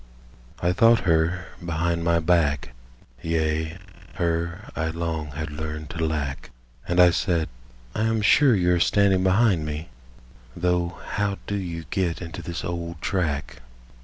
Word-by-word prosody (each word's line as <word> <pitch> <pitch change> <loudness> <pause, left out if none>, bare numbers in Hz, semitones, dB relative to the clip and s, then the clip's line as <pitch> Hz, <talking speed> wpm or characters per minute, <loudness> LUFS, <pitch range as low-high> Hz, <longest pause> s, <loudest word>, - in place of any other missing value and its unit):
I 90 +1 +3
thought 115 +3 +5
her 85 +1 +1 0.2
behind 85 0 -1
my 85 0 +3
back, 80 -6 +1 0.5
Yea, 80 0 -1 0.4
her 85 +3 -2
I 80 - -1
long 80 -1 -3
had 75 +1 -4
learned 75 0 -5
to 80 - -3
lack, 75 -4 -2 0.4
And 90 +1 +1
I 90 -1 +8
said: 85 -3 0 0.4
"I 110 - 0
am 115 -1 +1
sure 135 +3 +6
you 90 -2 +3
are 90 - +2
standing 100 +1 +3
behind 95 -3 +3
me, 75 +2 -5 0.7
Though 90 0 0
how 100 -1 -1
do - - -4
you 85 -5 -4
get 90 -3 0
into 80 -2 -7
this 85 -1 -5
old 85 -1 -4
track?" 80 -7 -2
85 Hz, 145 wpm, -25 LUFS, 80-90 Hz, 0.7 s, I